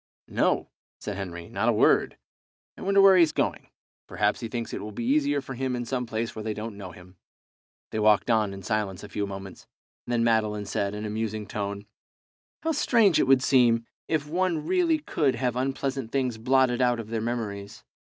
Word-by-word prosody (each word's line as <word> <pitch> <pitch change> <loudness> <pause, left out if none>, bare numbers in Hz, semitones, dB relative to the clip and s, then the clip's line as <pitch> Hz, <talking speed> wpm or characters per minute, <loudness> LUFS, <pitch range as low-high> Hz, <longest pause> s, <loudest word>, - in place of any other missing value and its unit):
"No," - - 0 0.3
said 105 - -5
Henry, 85 -3 -6
"not - - 0
a - - +4
word. - - +3 0.6
Wonder 200 +1 +1
where 195 -1 +8
he's 165 -3 +5
going. - - -2 0.4
Perhaps 105 0 0
he 115 - -4
thinks 115 0 -5
it - - -4
will 105 +1 -6
be 115 +3 -5
easier 145 +1 +2
for 135 - -7
him 130 0 -2
in 120 0 -3
some 125 0 -2
place 115 0 -3
where 110 - -5
they 110 0 -3
don't 110 0 -6
know 100 -2 -8
him." 90 +1 -15 0.7
They 110 - -2
walked 105 +2 +4
on 110 -3 +2
in 95 0 -9
silence 100 -2 -2
a - - -9
few 100 -1 -2
moments, 95 -1 -9 0.4
and 120 - -2
then 115 -1 +2
Madeline 110 -2 +1
said, 100 +1 -2
in 105 +1 -5
a - - -3
musing 110 -1 -3
tone 100 0 -4 0.8
"How 325 - +1
strange 230 - +3
it - - +2
would 135 -1 +5
seem 120 -4 +4 0.2
if 155 -3 -1
one 170 -1 0
really 340 - +2
could 150 - 0
have 125 0 -1
unpleasant 135 -1 -2
things 130 -4 -1
blotted 130 +1 +2
out 125 -1 +2
of 110 -1 -7
their 115 -1 -1
memories! 105 -4 -4
115 Hz, 200 wpm, -26 LUFS, 105-135 Hz, 0.8 s, where